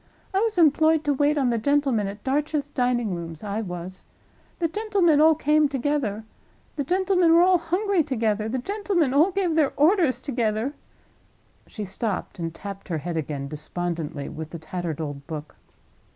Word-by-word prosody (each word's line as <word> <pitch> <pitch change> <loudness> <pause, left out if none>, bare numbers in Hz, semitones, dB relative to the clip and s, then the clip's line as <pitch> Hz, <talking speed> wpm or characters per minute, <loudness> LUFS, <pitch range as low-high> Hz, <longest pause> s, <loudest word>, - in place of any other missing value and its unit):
"I 385 - +3
was 440 -2 0
employed 315 -1 +4
to 290 -2 +1
wait 290 +2 +2
on 260 -4 +2
the 230 - 0
gentlemen 270 -5 +1
at 205 +1 -8
Darch's 290 +1 -1
Dining 245 -6 0
rooms—I 175 +5 -4
was. 180 -1 -7 0.5
The 335 - +1
gentlemen 380 -5 +2
all 320 0 +6
came 300 0 +3
together; 265 -6 -1 0.5
the 285 - -1
gentlemen 365 +1 +2
were 340 +1 +7
all 365 -1 +4
hungry 365 +3 +1
together; 220 -6 -1
the 260 - -1
gentlemen 370 - 0
all 310 +7 +5
gave 375 -3 0
their 310 -3 +2
orders 320 -2 +3
together—" 235 -1 -1 0.9
She 210 - -6
stopped, 200 -1 -4
and 165 -1 -3
tapped 195 +3 -8
her 165 - -2
head 170 +3 -4
again, 145 -3 -3
despondently, 155 0 -4
with 160 0 -7
the 170 - -7
tattered 165 0 -5
old 145 -3 -5
book. 150 -2 -7
260 Hz, 165 wpm, -25 LUFS, -, 0.9 s, were